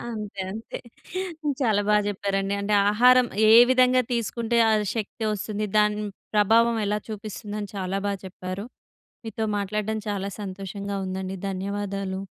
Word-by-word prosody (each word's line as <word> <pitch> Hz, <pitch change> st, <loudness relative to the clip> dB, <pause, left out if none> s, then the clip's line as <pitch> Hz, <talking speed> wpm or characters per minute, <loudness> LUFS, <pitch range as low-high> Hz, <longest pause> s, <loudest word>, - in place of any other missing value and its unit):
ఆ! -, -, -7 dB
అంతే 205 Hz, -3 st, -5 dB
అంతే. 220 Hz, +2 st, -7 dB, 0.8 s
చాలా 215 Hz, -5 st, +2 dB
బా 210 Hz, -, +5 dB
చెప్పారండి 195 Hz, 0 st, -1 dB
అంటే 205 Hz, +1 st, 0 dB, 0.2 s
ఆహారం 250 Hz, +3 st, +6 dB, 0.2 s
ఏ -, -, +8 dB, 0.2 s
విధంగా 255 Hz, 0 st, +5 dB
తీసుకుంటే 235 Hz, 0 st, -1 dB
ఆ -, -, +4 dB, 0.2 s
శక్తి 225 Hz, 0 st, -4 dB
వస్తుంది? 210 Hz, +1 st, -3 dB
దాని 210 Hz, 0 st, +3 dB, 0.3 s
ప్రభావం 225 Hz, +3 st, +4 dB
ఎలా 210 Hz, +1 st, 0 dB
చూపిస్తుందని 210 Hz, -1 st, -6 dB
చాలా 190 Hz, 0 st, -2 dB
బా 200 Hz, -, +1 dB
చెప్పారు. 185 Hz, +2 st, -6 dB, 0.6 s
మీతో 225 Hz, 0 st, -3 dB
మాట్లాడడం 210 Hz, +2 st, -2 dB
చాలా 200 Hz, -1 st, -2 dB
సంతోషంగా 200 Hz, +1 st, -5 dB
ఉందండి. 190 Hz, 0 st, -4 dB
ధన్యవాదాలు. 195 Hz, 0 st, -3 dB
205 Hz, 130 wpm, -25 LUFS, 195-220 Hz, 0.8 s, ఏ